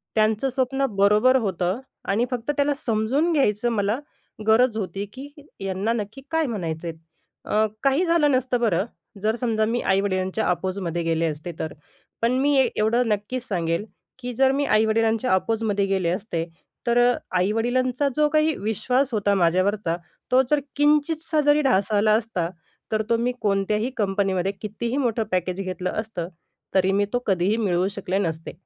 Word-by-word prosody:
त्यांचं 220 +4 +2
स्वप्न 270 +1 0
बरोबर 210 +6 +5
होतं 185 0 -1 0.3
आणि 215 +5 +2
फक्त 245 +2 -1
त्याला 285 0 +2
समजून 260 +5 0
घ्यायचं 240 -6 +2
मला 215 +3 0 0.5
गरज 225 +1 +4
होती 200 -1 -3
की 270 +2 -9 0.3
यांना 195 +3 -1
नक्की 220 +3 -5
काय 320 0 +2
म्हणायचेत. 170 -7 -4 0.5
अ, 215 +1 +2 0.2
काही 275 +6 +3
झालं 335 -4 +3
नसतं 255 -1 +1
बरं 195 -3 +2 0.4
जर 220 +1 +2
समजा, 225 -3 0
मी 235 +2 -1
आई-वडिलांच्या 190 +1 0
अपोझमध्ये 180 -2 -2
गेले 165 0 +1
असते 155 +2 -5
तर. 160 - -3 0.5
पण 230 +2 +2
मी 285 +1 +3 0.2
एवढं 230 +3 +2
नक्कीच 210 +4 -2
सांगेल 170 0 -1 0.3
की 250 0 -5
जर 265 +1 +4
मी 285 +1 0
आई-वडिलांच्या 225 +2 +2
आपोझमध्ये 205 0 +1
गेले 190 -3 0
असते, 175 -2 -2 0.4
तर 235 - +3
अ, - - 0 0.2
आई-वडिलांचा 245 +7 +1
जो 300 0 +4
काही 310 0 +2
विश्वास 250 +6 0
होता 205 -2 +2
माझ्यावरचा 185 0 +1 0.3
तो 255 +1 +6
जर 300 - +4 0.2
किंचितसा 300 +2 +2
जरी 295 +1 +4
ढासळला 210 -6 +2
आला 215 0 +4
असता, 185 -7 -3 0.4
तर 215 - +2
तो 230 - +3
मी 240 +2 0
कोणत्याही 210 +3 +1
कंपनीमध्ये, 195 -2 0
कितीही 230 +4 -3
मोठं 235 -5 +1
पॅकेज 185 +1 -1
घेतलं 185 -1 -3
असतं, 215 -6 -4 0.5
तरी 190 0 +3
मी 200 +1 +2
तो 245 - +2
कधीही 195 +2 +2
मिळवू 185 -4 +1
शकले 190 -1 -2
नसते. 165 -4 -3
215 Hz, 155 wpm, -24 LUFS, 190-255 Hz, 0.5 s, तो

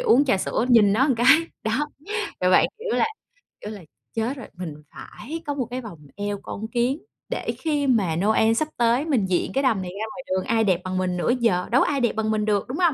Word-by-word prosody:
uống 295 - +4
trà 255 - +2
sữa 225 - -1
nhìn 215 -5 +6
nó 265 +7 +3
cái, 240 +2 +1 0.4
đó. 240 +7 0 0.5
Và 180 - +3
bạn - - +6
kiểu 460 0 -2
là - - +3 0.6
kiểu 210 - -6
là 205 -3 -8 0.3
"Chết 230 +5 -2
rồi! 250 - -8
Mình 175 -4 -6 0.2
phải 320 +5 -8
có 290 - -2
một 255 -5 -3
cái 255 +1 -3
vòng 200 -9 -10 0.2
eo 205 -1 -3
con 220 +2 -6
kiến 245 +5 0 0.3
để - - -2
khi 295 -3 0
mà 200 -10 +2
Noel 220 +4 +3
sắp 305 +6 0
tới 240 +5 +2
mình 255 -11 +1
diện 185 -2 0
cái 270 - +1
đầm 225 -8 +2
này 180 -1 -5
ra 220 - -1
ngoài 265 0 -8
đường 185 0 0
ai 225 -1 +2
đẹp 185 -4 +2
bằng 185 0 -3
mình 180 -1 -1
nữa 175 - 0
giờ, 180 -6 +1
đâu 260 - +5
có - - +3
ai 280 -1 0
đẹp 240 - +2
bằng 220 0 0
mình 215 -1 0
được" 205 -2 0
đúng 260 - -4
hông? 345 -5 +3
225 Hz, 245 wpm, -24 LUFS, 195-265 Hz, 0.6 s, nhìn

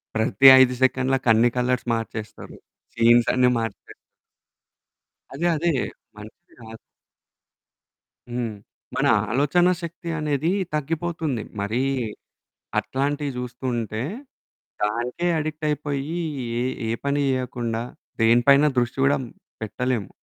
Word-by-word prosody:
ప్రతి 115 +4 +4
5 125 -1 +4
సెకండ్లకి 130 0 +1
అన్ని 115 +2 +4
కలర్స్ 125 0 0
మార్చేస్తారు. 110 -1 -6 0.4
సీన్స్ 120 0 +5
అన్ని 125 0 +4
మార్చేస్తారు. 115 -3 -6 1.4
అదే 155 +6 -1
అదే. 170 +2 +1 0.4
మంచిది 110 +12 -14
కాదు. 115 0 -10 1.5
హ్మ్. 120 -2 -2 0.4
మన - - +2 0.2
ఆలోచన 145 +8 +3 0.2
శక్తి 170 0 -7
అనేది 150 +2 0 0.2
తగ్గిపోతుంది. 155 -4 -2 0.2
మరి 110 +5 -1 1.0
అట్లాంటివి 140 +1 -1
చూస్తుంటే 120 -3 -3 0.8
దానికే 120 +10 -1
అడిక్ట్ 155 0 -4
అయిపోయి. 150 +2 -2 0.4
ఏ - - 0 0.2
ఏ - - -2 0.2
పని 140 +1 +1
చేయకుండా 120 -3 -2 0.4
దేని 115 +2 +5
పైన 140 +2 +7
దృష్టి 120 +1 0
కూడా 140 - +3 0.4
పెట్టలేము. 120 -1 -2
125 Hz, 100 wpm, -23 LUFS, 115-145 Hz, 1.5 s, పైన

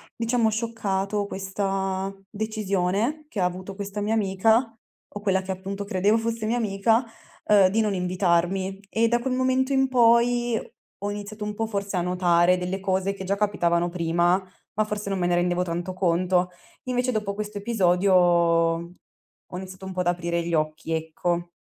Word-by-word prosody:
diciamo 230 -1 +1
scioccato 210 -3 -1
questa 195 0 -2 0.2
decisione 215 +5 -1
che 205 - -4
ha - - +3
avuto 185 +2 -4
questa 200 +1 -5
mia 210 +2 0
amica, 220 +3 +2 0.4
o - - -3
quella 195 -2 +1
che 190 0 -5
appunto 195 +2 -5
credevo 200 +2 +2
fosse 230 -1 -2
mia 230 +3 +1
amica, 225 +2 +2 0.4
ehm, 205 -3 +5
di 220 +4 +1
non 210 -2 0
invitarmi. 185 +1 0
E 230 +2 +2
da 240 - +2
quel 255 +2 -2
momento 260 +1 +1
in 265 0 +3
poi, 240 -1 +3 0.5
ho 205 - -1
iniziato 210 +1 -6
un 210 0 -3
po' 225 +1 -2
forse 200 -2 -3
a - - +1
notare 180 0 +3
delle 180 +2 -3
cose 190 0 0
che 190 -1 -7
già 195 +2 0
capitavano 175 -4 +1
prima, 175 +1 +1 0.4
ma 215 - +4
forse 210 -1 -4
non 195 - -1
me 175 - +1
ne 175 - +2
rendevo 175 0 +1
tanto 175 +1 -3
conto. 180 0 +1 0.3
Invece 250 0 0
dopo 210 -3 -2
questo 210 0 -5
episodio, 195 -3 +2
ho 170 0 0
iniziato 185 0 -8
un 190 - -5
po' 185 - -5
ad 180 - 0
aprire 170 -1 0
gli 170 - -4
occhi, 155 +1 -1
ecco. 170 +2 -2
195 Hz, 170 wpm, -25 LUFS, 180-215 Hz, 0.5 s, ehm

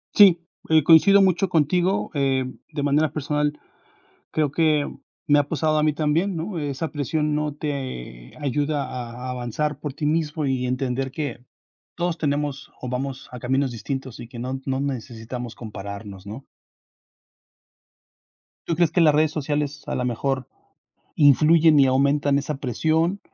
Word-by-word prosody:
Sí, 185 -5 +7 0.3
eh, 160 -1 +5
coincido 190 +6 +7
mucho 190 0 +3
contigo. 175 +3 +1
Eh, 135 -3 +1 0.3
de 145 -2 -3
manera 145 +2 +2
personal 150 0 -1 0.8
creo 155 -2 +1
que 155 -1 +1 0.4
me 145 0 +5
ha 145 - +3
pasado 155 0 +1
a - - +2
mí 155 - +3
también, 155 +6 0
¿no? 170 +3 -4
Esa 145 +1 -3
presión 150 +1 -1
no 150 -1 -2
te 130 - -6
ayuda 145 +1 -1
a 125 0 -6
avanzar 125 +4 -2
por 145 -2 -5
ti 150 - -5
mismo 155 0 0
y 130 -2 0
entender 130 +1 -2
que 140 -5 -5 0.5
todos 175 -1 -2
tenemos 145 -1 -2
o 125 - -5
vamos 130 +1 -4
a 125 - -8
caminos 130 +3 0
distintos 130 +2 -5
y 120 - -8
que 120 -1 -10
no 130 +2 -4
no 135 0 -1
necesitamos 120 -3 -5
compararnos, 100 -3 -8
¿no? 110 +7 -8 2.2
¿Tú 165 - 0
crees 170 -1 +2
que 175 - +3
las 155 -3 +5
redes 155 0 +3
sociales 145 -1 -2
a - - -2
la 125 - -1
mejor 130 +1 -1 0.7
influyen 155 +2 +6
y 135 - +6
aumentan 140 +2 +2
esa 150 0 -3
presión 160 - 0
145 Hz, 150 wpm, -23 LUFS, 130-155 Hz, 2.2 s, Sí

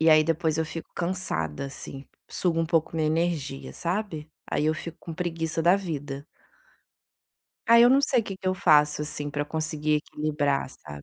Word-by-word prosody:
E 160 - +4
aí, 155 0 +7
depois 160 -1 +1
eu 160 - +2
fico 165 +1 -7
cansada, 170 - -2
assim, 135 0 -8 0.2
suga 170 -3 0
um 165 - +1
pouco 165 0 +1
minha 155 - +1
energia, 155 -4 -1
sabe. 170 -4 -3 0.2
Aí 150 - +1
eu 155 - +2
fico 165 +1 -7
com 165 - -7
preguiça 165 -1 -2
da 175 +4 +5
vida. 145 -6 -5 1.4
Ai, 235 0 +8
eu 240 - +8
não 270 +2 +5
sei 260 -4 +3
o - - -5
que 195 -3 -6
que 190 - -9
eu 185 - +2
faço, 150 -4 +4
assim, 150 -1 -4
para 145 0 -1
conseguir 155 0 -1
equilibrar, 150 -2 -1
sabe. 75 - -11
160 Hz, 185 wpm, -26 LUFS, 150-175 Hz, 1.4 s, Ai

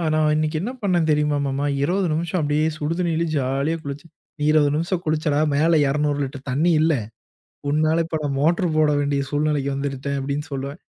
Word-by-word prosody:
"நான் 155 -1 +3
இன்னிக்கு 155 +1 0
என்ன 225 +7 -3
பண்ணன் 180 -4 +2
தெரிமா 150 -1 +2
மாமா? 140 +1 -1 0.2
20 180 +5 +1
நிமிஷம் 170 +3 -1
அப்டியே 150 +1 +1
சுடு 155 +1 -2
தண்ணிலயே 170 -1 0
ஜாலியா 140 +5 0
குளிச்சேன்." 140 +3 -7 0.3
"நீ - - -2
20 150 -2 +4
நிமிஷம் 170 +3 -1
குளிச்சடா, 155 -1 +1 0.2
மேல 160 +2 +3
200 145 0 0
லிட்டர் 135 0 -6
தண்ணி 160 +7 +2
இல்ல, 160 0 +3 0.8
உன்னால 155 +3 +2
இப்ப 160 -1 -2
நான் 140 -1 -1
மோட்டர் 170 +3 +2
போட 155 -1 +4
வேண்டிய 140 -1 0
சூழ்நிலைக்கு 145 -1 0
இருந்துட்டேன்" 140 0 -3
அப்டின்னு 140 +2 -3
சொல்லுவேன். 140 +2 -5
150 Hz, 175 wpm, -22 LUFS, 140-160 Hz, 0.8 s, 20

